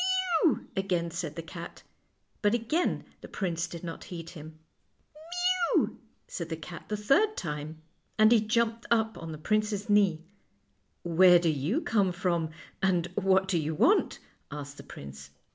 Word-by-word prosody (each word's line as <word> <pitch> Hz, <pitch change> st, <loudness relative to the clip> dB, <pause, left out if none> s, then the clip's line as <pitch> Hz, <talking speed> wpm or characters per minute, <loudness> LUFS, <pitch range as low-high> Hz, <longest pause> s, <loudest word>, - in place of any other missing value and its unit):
" 340 Hz, -2 st, +2 dB
Mew," 305 Hz, -, +2 dB
again 180 Hz, -4 st, -1 dB
said 165 Hz, -3 st, -4 dB
the 165 Hz, -, -5 dB
cat; 170 Hz, +1 st, -9 dB, 0.6 s
but 210 Hz, +2 st, +3 dB
again 240 Hz, +10 st, 0 dB, 0.2 s
the -, -, -9 dB
prince 170 Hz, -3 st, -2 dB
did 170 Hz, 0 st, -9 dB
not 165 Hz, -1 st, -6 dB
heed 170 Hz, -2 st, -8 dB
him. 155 Hz, -2 st, -11 dB, 0.6 s
" 355 Hz, +2 st, 0 dB
Mew," -, -, +1 dB, 0.3 s
said 170 Hz, -2 st, -5 dB
the 160 Hz, -, -3 dB
cat 170 Hz, +2 st, -9 dB
the 210 Hz, -, -2 dB
third 405 Hz, -, +3 dB
time, 155 Hz, 0 st, -5 dB, 0.3 s
and 215 Hz, 0 st, +6 dB
he 230 Hz, -3 st, +6 dB
jumped 230 Hz, +1 st, 0 dB
up 225 Hz, -1 st, +2 dB
on 165 Hz, -1 st, -7 dB
the 155 Hz, -, -6 dB
prince's 210 Hz, +4 st, 0 dB
knee. 190 Hz, -6 st, +3 dB, 0.4 s
" 100 Hz, -1 st, -45 dB, 0.2 s
Where 180 Hz, -1 st, +9 dB
do 170 Hz, -1 st, +1 dB
you 155 Hz, -, 0 dB
come 205 Hz, -, +2 dB
from, 170 Hz, -2 st, 0 dB, 0.3 s
and 180 Hz, -3 st, +2 dB
what 190 Hz, -1 st, +2 dB
do 180 Hz, -3 st, +1 dB
you 155 Hz, 0 st, -2 dB
want? -, -, +3 dB, 0.2 s
" -, -, -44 dB
asked 145 Hz, -1 st, -7 dB
the -, -, -10 dB
prince. 70 Hz, 0 st, -10 dB
180 Hz, 175 wpm, -29 LUFS, 160-215 Hz, 0.6 s, Where